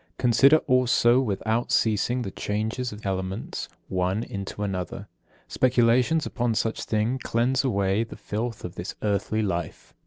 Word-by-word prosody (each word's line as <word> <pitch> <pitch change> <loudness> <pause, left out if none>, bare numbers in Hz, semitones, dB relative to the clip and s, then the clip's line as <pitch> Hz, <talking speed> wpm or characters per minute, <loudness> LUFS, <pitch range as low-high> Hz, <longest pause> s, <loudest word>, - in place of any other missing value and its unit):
Consider 135 +5 +5
also 125 -1 +4
without 110 0 -1
ceasing 115 +3 +1
the 95 - -5
changes 110 +6 -2
of 105 0 -10
elements, 95 +1 -3 0.2
one 95 +4 0
into 100 0 -5
another. 95 -3 -4 0.4
Speculations 125 +4 +3
upon 120 -2 -1
such 115 0 -1
things 115 +4 0
cleanse 125 +3 +1
away 100 -4 +1
the 115 - -10
filth 115 +1 -4
of 90 - -6
this 90 0 -6
earthly 105 +1 0
life. 85 -5 -4
110 Hz, 135 wpm, -25 LUFS, 100-125 Hz, 0.4 s, Consider